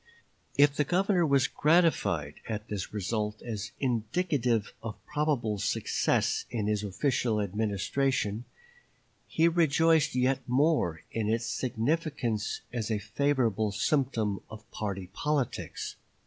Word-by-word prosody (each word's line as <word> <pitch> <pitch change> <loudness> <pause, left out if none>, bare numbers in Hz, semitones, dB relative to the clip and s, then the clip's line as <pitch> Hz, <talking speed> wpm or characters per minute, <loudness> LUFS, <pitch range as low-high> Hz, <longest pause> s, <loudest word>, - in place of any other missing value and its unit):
If 145 0 +5
the 150 - +2
Governor 180 +2 +2
was 140 -2 +4
gratified 135 - +2 0.2
at 105 -1 -4
this 100 -3 -4
result 105 +1 -2
as 105 -3 -4
indicative 120 - 0
of 115 -2 -5
probable 130 -9 0
success 105 - +1
in 115 -4 -2
his 105 0 0
official 115 +2 0
administration, 105 +3 -1 0.8
he 165 +1 +3
rejoiced 165 -3 +3
yet 130 +1 +2
more 125 - +2
in 110 -2 -1
its 115 +1 0
significance 120 -3 -1
as 115 -3 -2
a 110 - +1
favorable 110 -2 0
symptom 110 -3 0
of 110 +1 -11
party 95 -3 -4
politics. 150 -4 -2
115 Hz, 115 wpm, -29 LUFS, 105-145 Hz, 0.8 s, If